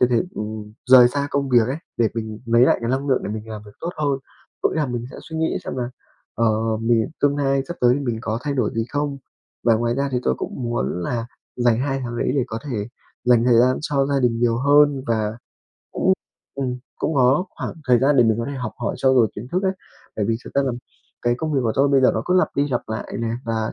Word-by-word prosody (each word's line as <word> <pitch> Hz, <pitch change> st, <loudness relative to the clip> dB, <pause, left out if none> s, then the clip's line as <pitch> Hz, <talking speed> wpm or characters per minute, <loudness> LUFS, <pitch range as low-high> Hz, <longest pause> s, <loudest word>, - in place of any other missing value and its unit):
thực 125 Hz, 0 st, +4 dB
hiện, 125 Hz, +9 st, +1 dB
ừm, 105 Hz, 0 st, -6 dB, 0.2 s
rời 125 Hz, -2 st, +9 dB
xa 140 Hz, +3 st, -2 dB
công 140 Hz, -1 st, 0 dB
việc 120 Hz, -3 st, +4 dB
ấy, 135 Hz, -, -1 dB, 0.2 s
để 115 Hz, -2 st, +3 dB
mình 110 Hz, -1 st, -4 dB
lấy 115 Hz, +1 st, +4 dB
lại 130 Hz, -, +5 dB
cái 115 Hz, 0 st, -2 dB
năng 135 Hz, +2 st, -1 dB
lượng 130 Hz, -, +2 dB
để -, -, -3 dB
mình 110 Hz, +1 st, -6 dB
làm 110 Hz, -1 st, -7 dB
việc -, -, -11 dB
tốt 170 Hz, -, -3 dB
hơn. 145 Hz, -3 st, 0 dB, 0.4 s
Có -, -, +3 dB
nghĩa -, -, -4 dB
là 150 Hz, -, +1 dB
mình 120 Hz, -2 st, -3 dB
sẽ -, -, -10 dB
suy 160 Hz, -, -8 dB
nghĩ 160 Hz, 0 st, 0 dB
xem -, -, -5 dB
là, 120 Hz, -1 st, -2 dB, 0.4 s
ờ, 110 Hz, 0 st, +1 dB
mình 115 Hz, 0 st, +2 dB
tương 145 Hz, 0 st, +2 dB
lai 135 Hz, -1 st, +1 dB
sắp 175 Hz, -, -5 dB
tới 125 Hz, 0 st, +5 dB
thì 145 Hz, -, -2 dB
mình 120 Hz, -5 st, -2 dB
có 110 Hz, 0 st, -2 dB
thay 145 Hz, -1 st, -2 dB
đổi 125 Hz, -6 st, +1 dB
gì 115 Hz, 0 st, 0 dB
không. 145 Hz, -1 st, -2 dB, 0.5 s
Và 115 Hz, -, +5 dB
ngoài 120 Hz, +1 st, 0 dB
ra 140 Hz, +1 st, 0 dB
thì 125 Hz, -, +2 dB
tôi 65 Hz, -, +1 dB
cũng -, -, -4 dB
muốn 120 Hz, -6 st, -2 dB
là 115 Hz, +5 st, -2 dB, 0.3 s
dành 120 Hz, -2 st, +2 dB
2 135 Hz, 0 st, -1 dB
tháng 120 Hz, 0 st, -4 dB
đấy -, -, 0 dB
để 130 Hz, -, +2 dB
có 110 Hz, -2 st, -4 dB
thể 105 Hz, -1 st, -3 dB, 0.4 s
dành 120 Hz, -1 st, +4 dB
thời 120 Hz, -2 st, +5 dB
gian 130 Hz, +2 st, +4 dB
cho 140 Hz, -3 st, +1 dB
gia 140 Hz, -1 st, +1 dB
đình 120 Hz, -2 st, +1 dB
nhiều 120 Hz, -1 st, +2 dB
hơn. 145 Hz, 0 st, +4 dB
Và 110 Hz, 0 st, -1 dB, 0.5 s
cũng 190 Hz, -, +2 dB, 0.4 s
ừm, 130 Hz, -2 st, -2 dB, 0.2 s
cũng 160 Hz, -, -1 dB
có 135 Hz, +6 st, +4 dB
khoảng -, -, -6 dB
thời 125 Hz, -1 st, +6 dB
gian 140 Hz, +1 st, +3 dB
để 120 Hz, -, +6 dB
mình 110 Hz, 0 st, +2 dB
có 115 Hz, -, -1 dB
thể 140 Hz, -, -4 dB
học 120 Hz, -4 st, -4 dB
hỏi -, -, -2 dB
trau 130 Hz, 0 st, +3 dB
dồi 115 Hz, -4 st, +5 dB
kiến 120 Hz, +5 st, -7 dB
thức 185 Hz, +2 st, +1 dB
ấy. 190 Hz, -1 st, +2 dB, 0.4 s
Bởi 105 Hz, -, 0 dB
vì 115 Hz, -, +2 dB
thực -, -, -11 dB
ra 140 Hz, -, +3 dB
là 130 Hz, -2 st, -1 dB, 0.5 s
cái 120 Hz, 0 st, +2 dB
công 155 Hz, -1 st, -2 dB
việc 135 Hz, -, +3 dB
của 110 Hz, -, +1 dB
tôi 140 Hz, +1 st, +4 dB
bây 135 Hz, -1 st, +4 dB
giờ 130 Hz, -, +5 dB
nó -, -, -1 dB
cứ 180 Hz, -, +2 dB
lặp -, -, +3 dB
đi 145 Hz, +1 st, +2 dB
lặp 125 Hz, -3 st, -1 dB
lại 110 Hz, +1 st, -5 dB
nè. 115 Hz, -, -1 dB, 0.2 s
Và 110 Hz, -1 st, -2 dB
125 Hz, 265 wpm, -22 LUFS, 115-140 Hz, 0.5 s, rời